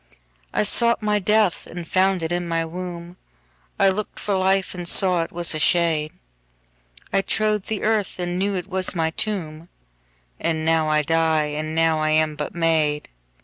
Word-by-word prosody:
13I - - +2
sought 235 +2 +3
my 210 0 +1
death 210 -1 +1
and 175 -1 -8
found 190 -1 +1
it 160 - -3
in 175 0 -2
my 165 -1 -1
womb,14I 180 +2 -5
lookt 215 +1 -5
for 205 - -2
life 190 0 +1
and 175 -2 -6
saw 180 -1 +4
it 165 - -5
was 175 -1 +1
a 155 - -3
shade,15I - - -3
trode 215 -1 +1
the 220 -2 -4
earth 215 -2 0
and 175 0 -3
knew 200 +1 0
it 180 - -3
was 190 -1 -1
my 160 -1 0
tomb,16And 155 - -5
now 160 -1 +2
I 150 0 +2
die, 160 -1 +1
and 155 +1 -4
now 165 -1 +2
I 155 0 0
am 155 0 +1
but - - -5
made. 160 -3 0
170 Hz, 165 wpm, -22 LUFS, 155-190 Hz, -, saw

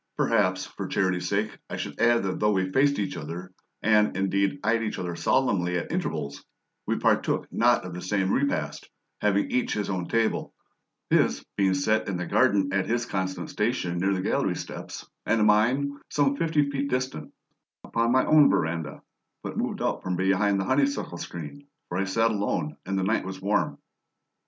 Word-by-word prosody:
Perhaps, 95 -5 +2
for 100 - -6
charity's 90 -2 0
sake, 105 +2 -1
I - - -4
should - - -5
add 120 -1 +4
that 95 -1 -2
though 105 0 +3
we 95 -1 0
faced 140 +5 +3
each 95 -2 -2
other, 85 +4 -7 0.3
and, 105 -2 +3
indeed, 100 +6 +1
eyed 115 +2 +2
each 110 -1 -3
other 90 -2 -4
solemnly 90 -7 +1
at 85 - -4
intervals, 70 -1 -3 0.4
we - - +1
partook - - +1
not - - +3
of 90 - -6
the 90 - -6
same 95 +1 0
repast, 140 +1 -1 0.3
having 100 -1 +1
each 125 - 0
his 105 -2 -2
own 90 -2 -2
table; 115 -1 0 0.6
his - - +2
being 95 -1 +2
set 110 +4 +1
in 95 - -2
the 90 - -3
garden 95 -2 +2
at 95 -1 +1
his 120 +1 0
constant 95 -5 -3
station 105 -6 -1
near 95 +2 +1
the 95 - -2
gallery - - 0
steps, - - -7 0.2
and 110 -2 +3
mine, 125 +7 +3
some 140 -1 +2
fifty 155 -2 +1
feet 140 0 -2
distant, 125 - -3 0.5
upon 115 0 0
my 130 +1 +4
own 155 -2 +6
veranda, 80 -3 -1 0.4
but - - -5
moved - - -2
out - - -1
from 90 -1 -2
behind 95 +2 +2
the 95 - -1
honeysuckle 140 -9 0
screen, 85 - -8 0.2
for 90 - -2
I 100 - +1
sat 115 +4 +2
alone 105 +8 -1
and 95 0 -1
the 95 - 0
night 110 +4 +1
was 95 0 -6
warm. 100 +2 0
100 Hz, 180 wpm, -26 LUFS, 95-115 Hz, 0.6 s, own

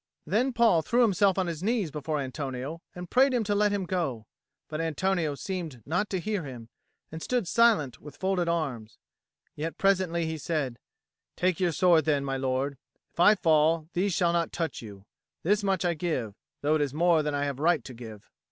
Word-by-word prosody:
Then 245 +7 +1
Paul 230 -8 +4
threw 240 +9 +2
himself 195 -3 +3
on 190 - +1
his 170 -2 -4
knees 210 -5 0
before 150 +1 -3
Antonio 135 +3 -5
and 180 0 -7
prayed 260 +5 +4
him 235 - +1
to 205 0 0
let 205 0 +3
him 200 -2 -1
go; 160 - -2 0.4
but 155 +1 -4
Antonio 165 -1 0
seemed 160 - -5
not 180 +7 -1
to 190 - -1
hear 210 +2 -2
him, 120 -5 -9 0.4
and 160 +1 -7
stood 245 -3 -1
silent 210 - +3
with 145 -1 -11
folded 185 -2 0
arms. 135 -10 -3 0.6
Yet 160 +2 -4
presently 185 -4 +2
he 160 -1 -3
said, 140 -6 -2 0.6
"Take 180 -2 0
your 180 -2 +2
sword 165 0 +4
then, 145 -3 +1
my 135 -1 -2
lord. 130 +1 -1 0.3
If - - -19
I 210 +5 +7
fall, 160 -2 +2
these 195 +3 +1
shall 170 -1 +2
not 170 -1 0
touch 165 -4 -3
you. 100 -3 -11 0.4
This 205 +4 +2
much 190 -2 0
I 175 - +2
give, 150 - -2 0.3
though 150 +2 +2
it 155 - +2
is 145 -1 -1
more 170 0 +4
than 150 -1 -2
I 145 0 0
have 140 -2 -3
right 160 -3 +2
to 130 - -9
give." 110 -3 -11
165 Hz, 200 wpm, -28 LUFS, 145-190 Hz, 0.6 s, I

